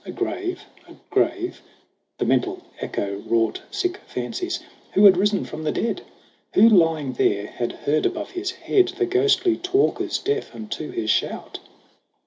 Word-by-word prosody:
A - - -7
grave 365 0 -3 0.2
a - - -14 0.2
grave 365 0 0 0.6
the - - -1
mental 370 -1 +1 0.2
echo 100 0 -3
wrought 115 -1 +1
Sick 375 -2 -1
fancies! 360 -3 -4 0.3
Who 200 - +6
had 195 -2 +9
risen 200 +2 +1
from 155 - -7
the 155 - 0
dead? 230 - -1 0.5
Who, 225 - +8
lying 165 - +3
there, 100 -4 +1
had 120 +2 -3
heard 150 +2 +1
above - - -5
his 370 +1 -3
head 375 0 +2
The 375 +1 -1
ghostly 375 -2 +3
talkers 370 +4 +1
deaf 425 0 -2
unto 210 -8 -5
his 110 -1 -1
shout - - -2
340 Hz, 150 wpm, -23 LUFS, -, 0.6 s, had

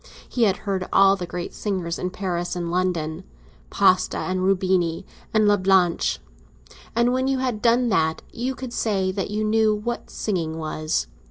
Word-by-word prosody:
He 240 -2 +1
had 195 -3 +2
heard 190 -2 -1
all 195 0 +6
the 180 -3 -5
great 175 0 -5
singers 180 -5 -3
in 180 - -2
Paris 180 -2 -3
and 170 -1 -3
London—Pasta 185 +2 0
and 185 0 -2
Rubini 185 -3 +1 0.3
and 215 -1 +3
Lablache—and 190 - 0
when 260 +1 +1
you 270 0 +1
had 250 -5 -2
done 240 +1 +3
that, 160 -6 +1
you 255 +3 -3
could 255 -2 -7
say 195 -5 0
that 195 0 -3
you 210 +1 -1
knew 215 0 +3
what 235 +3 -4
singing 165 -6 -2
was. 155 - -2
190 Hz, 155 wpm, -23 LUFS, 175-215 Hz, 0.3 s, all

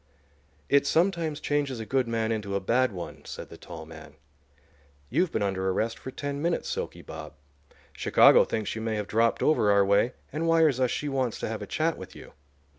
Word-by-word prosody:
"It 140 0 +3
sometimes 165 -3 +1
changes 145 -5 -1
a 110 - -5
good 130 +1 0
man 115 -1 -1
into 105 -3 -2
a - - +1
bad 120 +6 +2
one," 90 -3 -8
said - - -8
the - - -10
tall 80 -2 -9
man. 80 -1 -12 1.0
"You've 170 +7 +2
been 105 - -1
under 95 -1 -1
arrest 110 +5 -1
for - - -7
ten 140 +1 -4
minutes, 170 +1 -1
'Silky' - - -4
Bob. - - -9 0.6
Chicago - - +6
thinks 110 -2 -3
you 110 - -4
may 110 -1 -1
have 105 -2 -3
dropped 115 +1 +2
over 155 -9 +3
our 100 -1 +5
way 100 +5 +3 0.2
and 160 +3 -1
wires 160 -5 +4
us 130 -1 +2
she 150 - -2
wants 130 -4 -1
to - - -2
have 110 -1 -4
a 100 - -6
chat 160 +7 -1
with 95 - -10
you. - - -12
115 Hz, 200 wpm, -27 LUFS, 100-145 Hz, 1.0 s, Chicago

